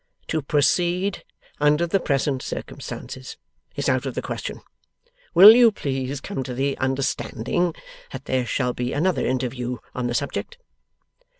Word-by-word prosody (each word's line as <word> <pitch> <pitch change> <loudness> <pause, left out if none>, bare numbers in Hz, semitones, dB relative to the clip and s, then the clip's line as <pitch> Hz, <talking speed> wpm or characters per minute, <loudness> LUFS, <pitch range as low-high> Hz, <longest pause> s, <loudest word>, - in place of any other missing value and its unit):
To 160 - 0
proceed 175 +6 +1 0.4
under 150 +3 +3
the 185 +3 +1
present 135 -4 0
circumstances - - -7 0.4
is - - -2
out - - +1
of - - -5
the - - -1
question. - - -5 0.7
Will 195 +5 +12
you 240 -2 +7
please 135 -6 -3
come 135 - -4
to 125 -1 -5
the 135 +2 0
understanding 135 +4 -1 0.4
that 130 0 -8
there 130 -2 0
shall 125 +1 0
be 125 +1 -3
another 180 +5 +1
interview 125 -1 -2 0.2
on 125 -1 -2
the 120 - -2
subject? 140 - -3
140 Hz, 140 wpm, -23 LUFS, 130-170 Hz, 0.7 s, Will